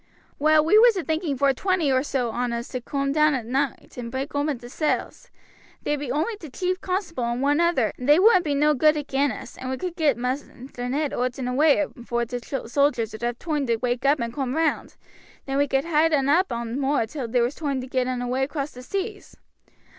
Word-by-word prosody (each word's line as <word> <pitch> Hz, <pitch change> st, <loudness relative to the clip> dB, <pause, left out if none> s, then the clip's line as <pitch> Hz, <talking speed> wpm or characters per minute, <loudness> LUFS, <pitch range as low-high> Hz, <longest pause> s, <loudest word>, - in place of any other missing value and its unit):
"Well, 310 Hz, +1 st, +4 dB
we 420 Hz, +7 st, +6 dB
was 465 Hz, -2 st, +6 dB
a 365 Hz, -, -1 dB
thinking 315 Hz, -3 st, -1 dB
vor 275 Hz, +1 st, +3 dB
twenty 355 Hz, -1 st, +1 dB
or 260 Hz, 0 st, +3 dB
so 260 Hz, -4 st, -1 dB
on 245 Hz, +1 st, -2 dB
us 235 Hz, +1 st, -4 dB
to 255 Hz, -, -4 dB
coom 275 Hz, +2 st, -2 dB
down 305 Hz, 0 st, +3 dB
at 245 Hz, -4 st, -4 dB
noight 270 Hz, +3 st, -2 dB
and 235 Hz, -1 st, -5 dB
break 270 Hz, +2 st, -4 dB
open 290 Hz, -1 st, 0 dB
t' 240 Hz, 0 st, -11 dB
cells. 300 Hz, +5 st, -2 dB, 0.5 s
There 295 Hz, -, 0 dB
be 285 Hz, -3 st, -4 dB
only 315 Hz, -, -1 dB
t' 320 Hz, -7 st, -10 dB
chief 365 Hz, +6 st, -2 dB
constable 365 Hz, -, -2 dB
and 235 Hz, +1 st, -2 dB
one 290 Hz, +3 st, +2 dB
other, 335 Hz, -, +2 dB
and 250 Hz, +3 st, -3 dB
they 295 Hz, -, +8 dB
wouldn't 375 Hz, -1 st, +5 dB
be 295 Hz, -3 st, -1 dB
no 300 Hz, +2 st, +3 dB
good 305 Hz, +2 st, +4 dB
agin 285 Hz, -1 st, 0 dB
us, 215 Hz, -, -9 dB
and 260 Hz, -, -5 dB
we 260 Hz, -, -2 dB
could 360 Hz, +1 st, -4 dB
get 310 Hz, -7 st, +2 dB
Maister 250 Hz, 0 st, -4 dB
Ned 290 Hz, +2 st, -1 dB
owt 250 Hz, +1 st, -1 dB
and 260 Hz, -2 st, -3 dB
away 295 Hz, +4 st, +3 dB
long -, -, -16 dB
afore 240 Hz, 0 st, -2 dB
t' 245 Hz, +1 st, -4 dB
sojers 245 Hz, -2 st, 0 dB
would 220 Hz, -, -9 dB
have 240 Hz, 0 st, -2 dB
toime 300 Hz, -4 st, -2 dB
to 230 Hz, -, +2 dB
wake 245 Hz, +2 st, -2 dB
up 280 Hz, +1 st, +3 dB
and 235 Hz, 0 st, -3 dB
coom 265 Hz, -1 st, -2 dB
round; 320 Hz, 0 st, 0 dB, 0.5 s
then 275 Hz, 0 st, -1 dB
we 285 Hz, -, +3 dB
could 270 Hz, +2 st, 0 dB
hide 325 Hz, 0 st, +2 dB
un 275 Hz, -2 st, +2 dB
up 345 Hz, +4 st, +3 dB
on 235 Hz, +2 st, -3 dB
moor 275 Hz, -3 st, +1 dB
till 255 Hz, +1 st, -5 dB
there 240 Hz, +1 st, +2 dB
was 245 Hz, +4 st, -1 dB
toime 285 Hz, -4 st, -2 dB
to 255 Hz, -, -5 dB
get 255 Hz, -1 st, -1 dB
un 250 Hz, -1 st, -2 dB
away 250 Hz, +2 st, -1 dB
across 285 Hz, +1 st, -3 dB
the 250 Hz, -, -11 dB
seas. 395 Hz, -, -5 dB
275 Hz, 235 wpm, -24 LUFS, 250-305 Hz, 0.5 s, they